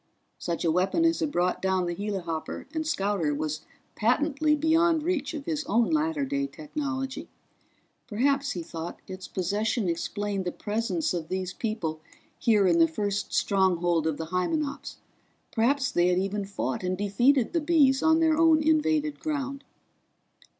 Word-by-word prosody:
Such 170 0 -3
a 165 - +3
weapon 190 - +2
as 330 0 +2
had 310 -3 -1
brought 180 -3 0
down 190 -1 +1
the 175 - -2
helihopper 180 -5 -4
and 315 -1 -2
scouter 195 - 0
was 155 +1 -3 0.3
patently 295 +6 +2
beyond 320 +1 +3
reach 320 -4 -1
of 290 -2 -6
his 310 -2 -2
own 230 +4 +2
latter 310 -2 +1
day 280 +1 -1
technology. 280 -3 -5 0.8
Perhaps, 275 +5 +1
he 175 - -4
thought, 165 +1 -7
its 185 0 -8
possession 205 +4 -1
explained 200 +3 -2
the 180 - -1
presence 205 -6 -2
of 165 -3 -3
these 185 -1 -3
people 210 -9 -3 0.4
here 215 -4 +3
in 170 -2 +4
the 165 - +6
first 205 +5 -2
stronghold 175 -4 +2
of 155 -2 -1
the 160 - -4
Hymenops; 280 - -2 0.5
perhaps 260 +2 +1
they 175 0 +3
had 180 0 +2
even 195 +2 -1
fought 185 -10 -3
and 185 0 -2
defeated 240 - +2
the 335 - +1
Bees 290 -4 +4
on 320 0 +4
their 320 -1 +4
own 325 -1 +6
invaded 310 -1 +1
ground. 275 -2 -3
220 Hz, 155 wpm, -27 LUFS, 180-295 Hz, 0.8 s, the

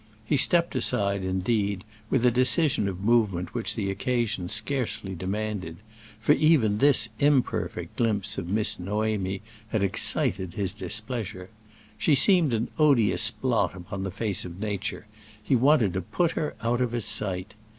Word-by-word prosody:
He 145 - 0
stepped 170 +5 +3
aside, 100 -5 +1
indeed, 95 +1 -1 0.3
with 125 -2 +1
a 125 - +5
decision 130 - +2
of 95 0 -5
movement 100 -6 +1
which 120 -2 0
the 100 -3 -2
occasion 115 -2 -2
scarcely 110 -8 -2
demanded; 95 -2 -4 0.4
for 115 - +1
even 135 -11 +2
this 130 -5 +4
imperfect 140 -3 0
glimpse 105 -4 -1
of 85 - -7
Miss 105 +1 +2
Noémie 100 0 -2 0.3
had 110 -2 -1
excited 95 -1 +2
his 95 -3 -1
displeasure. 105 -1 -5 0.5
She 150 - +3
seemed 175 -2 +4
an 115 +1 -1
odious 120 -7 +4
blot 110 -5 -1
upon 95 +2 -7
the 95 - -3
face 105 0 -2
of 90 +1 -9
nature; 105 0 -4 0.4
he 130 - +1
wanted 125 - +3
to 95 - -2
put 165 - -1
her 150 - -4
out 120 +2 0
of 120 -2 -1
his 120 -4 -2
sight. 95 -4 -1
110 Hz, 150 wpm, -26 LUFS, 95-125 Hz, 0.5 s, a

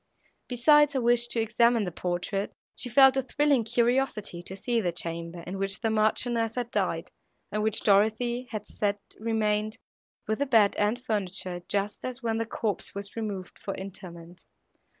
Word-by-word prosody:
Besides 295 +4 +5
her 265 - 0
wish 240 0 +3
to 235 - -2
examine 230 +1 +3
the 180 - -3
portrait, 180 +4 -3 0.2
she 250 - -3
felt 270 +1 +6
a - - +3
thrilling 280 -1 +2
curiosity 235 -5 0
to 185 +2 -7
see 235 +3 0
the 180 -4 0
chamber, 170 0 -5
in 190 +2 -5
which 195 +1 -1
the 225 -2 0
Marchioness 225 +1 +1
had 245 -1 -3
died, 180 -5 -1 0.4
and 210 - -1
which 220 0 +1
Dorothée 220 +5 +2
had 215 -2 -5
said 205 -1 -1 0.2
remained, 215 -1 0 0.5
with 220 - -1
the 285 - 0
bed 220 -5 +4
and 210 +4 +1
furniture, 190 -6 -2
just 205 0 -1
as 255 0 -5
when 225 -1 0
the 230 - -2
corpse 215 -3 -3
was 200 0 -5
removed 205 -5 -5
for 195 - -5
interment. 175 -2 -9
215 Hz, 170 wpm, -28 LUFS, 195-240 Hz, 0.5 s, felt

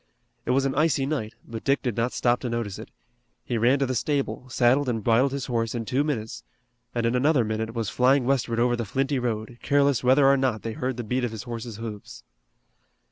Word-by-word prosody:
It - - -2
was 135 +2 +3
an 135 - 0
icy 145 -2 +2
night, 135 -7 -3
but 115 -1 -7
Dick 140 +1 +1
did 125 -5 -1
not 120 +2 0
stop 120 0 +1
to 125 - -4
notice 115 -4 -3
it. - - -9 0.6
He 120 - -1
ran 125 +5 +4
to 140 - +1
the 130 - -2
stable, 135 +1 -2
saddled 130 +2 +3
and 115 -3 -2
bridled 120 +5 +3
his 140 -1 -3
horse 115 -2 -1
in 115 -1 -3
two 130 +6 +1
minutes, 115 -8 -4 0.5
and 120 -1 0
in 115 - +1
another 130 -1 +3
minute 110 +1 -3
was 115 -5 -2
flying 130 +4 +3
westward 125 -3 0
over 120 0 +3
the 120 - -3
flinty 135 +5 -1
road, 120 0 -3
careless 140 -3 +2
whether 130 +3 +5
or 140 0 +5
not 130 -5 0
they 115 - -3
heard 130 +2 -3
the 120 - -3
beat 125 +3 -1
of 120 - 0
his 110 -2 -7
horse's 115 -2 -6
hoofs. 110 -2 -8
125 Hz, 225 wpm, -25 LUFS, 115-135 Hz, 0.6 s, whether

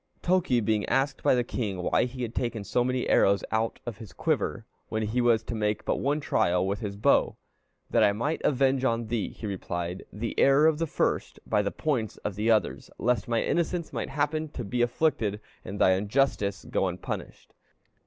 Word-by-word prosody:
Toki 175 -9 +2
being 110 -1 +1
asked 135 0 +1
by - - +4
the 125 - +2
king 100 -7 -3
why - - +2
he 125 0 -5
had 115 -1 -4
taken 120 -4 -2
so 120 +4 +1
many 125 0 0
more - - -1
arrows 100 0 +4
out 110 +1 0
of 120 -4 -5
his 110 -5 -10
quiver, - - -1 0.2
when 110 0 -1
he 110 +4 0
was 115 -2 +3
to - - -5
make 105 -1 -1
but - - 0
one 145 +3 0
trial 90 - +1
with 100 +1 -1
his 100 -2 -4
bow, 100 - +2 0.5
'That - - +4
I 100 - +4
might 130 +10 -2
avenge 135 -1 +2
on 115 -3 0
thee,' 115 -3 -1
he - - -10
replied, 90 -2 -4
'the 110 +3 -4
error 140 +2 +5
of 160 -1 +3
the 165 - 0
first, - - -1
by 105 -2 +2
the 100 - -1
points 125 -7 -2
of 105 - -1
the 105 +4 -1
others, 110 -2 +1
lest 120 -4 0
my 115 -1 +1
innocence 170 0 -1
might - - -3
happen 155 +2 -1
to 125 - -4
be 120 +3 -2
afflicted, 120 -5 +1 0.2
and 100 +3 -6
thy 95 - +5
injustice 100 0 0
go 95 - 0
unpunished.'" 90 0 -6
115 Hz, 205 wpm, -27 LUFS, 105-135 Hz, 0.5 s, error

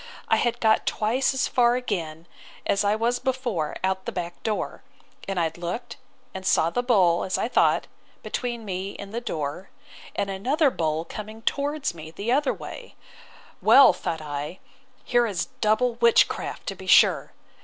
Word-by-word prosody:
I - - +4
had 240 - 0
got 220 -1 +2
twice 230 +5 +1
as 265 -1 0
far 240 -1 +3
again, 170 -10 -3 0.4
as 200 - +1
I 205 +1 +2
was 235 +2 0
before, 250 - -2
out 190 0 +1
of - - -31
the - - -3
back 175 -1 -5
door: 215 -2 -3 0.5
and 195 -2 -1
I 165 -1 +1
looked 175 +7 -5 0.4
and 190 - -6
saw 165 -3 +2
the 245 - 0
bull, 190 -9 +3
as 185 - -1
I - - 0
thought, - - +3 0.4
between 240 -3 -4
me 190 0 -4
and 200 +1 -9
the 235 - -2
door; 155 -3 -4 0.5
and 200 - -1
another 270 - +2
bull 160 -3 -1
coming 215 +3 -8
towards 285 - -1
me 160 -2 -9
the 200 +8 -3
other 280 +2 +2
way: - - -9 0.7
Well, 275 -8 +8
thought 165 -2 -4
I, 150 +3 -5 0.5
here 240 -1 +2
is 195 -5 -3
double 225 +3 +2
witchcraft, 235 0 +2
to - - -3
be - - -11
sure! - - +5
210 Hz, 170 wpm, -25 LUFS, 175-245 Hz, 0.7 s, Well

